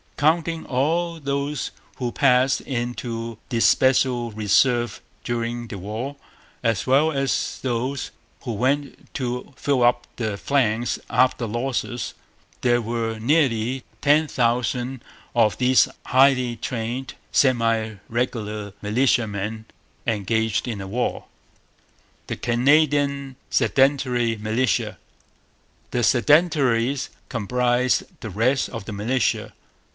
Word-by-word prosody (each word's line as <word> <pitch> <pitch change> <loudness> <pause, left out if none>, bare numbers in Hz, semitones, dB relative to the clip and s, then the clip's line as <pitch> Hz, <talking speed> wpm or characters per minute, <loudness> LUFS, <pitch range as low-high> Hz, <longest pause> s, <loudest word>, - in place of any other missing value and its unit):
Counting 160 +2 +1
all 165 +6 0
those 140 +1 -2 0.2
who 125 -3 -3
passed 130 +1 +3
into 120 -2 -4
the 120 -3 0
special 125 -1 +3
reserve 120 +3 +2 0.2
during 120 0 -3
the 100 -3 -7
war, 110 +9 -5 0.5
as 115 -4 +1
well 140 +5 +4
as 135 -2 -1
those 130 +2 -2 0.3
who 120 - -4
went 140 +6 -1
to 125 +1 -3
fill 130 +2 0
up 120 0 +3
the 110 -4 -2
ranks 120 -4 +1
after 125 -1 +2
losses, 120 +1 -3 0.5
there 120 -1 +3
were 115 0 -2
nearly 130 -2 +1 0.2
ten 150 +2 +4
thousand 125 0 0 0.3
of 110 -3 +3
these 130 0 +4 0.2
highly 130 -2 +4
trained, 120 +2 -4 0.2
semi 115 -4 +2
regular 110 -4 -3
militiamen 110 -2 0 0.4
engaged 110 0 0
in 110 -4 -3
the 95 - -6
war. 120 +6 -2 1.0
The - - -3
Canadian 140 +1 +2
Sedentary 130 -4 +2
Militia. 110 +2 0 0.9
The 120 - -1
'Sedentaries' 135 -2 +3 0.2
comprised 125 +3 +1 0.2
the 110 - -5
rest 120 +8 +1
of 115 -5 -7
the 110 - -6
militia. 110 +4 0
120 Hz, 105 wpm, -23 LUFS, 115-135 Hz, 1.0 s, well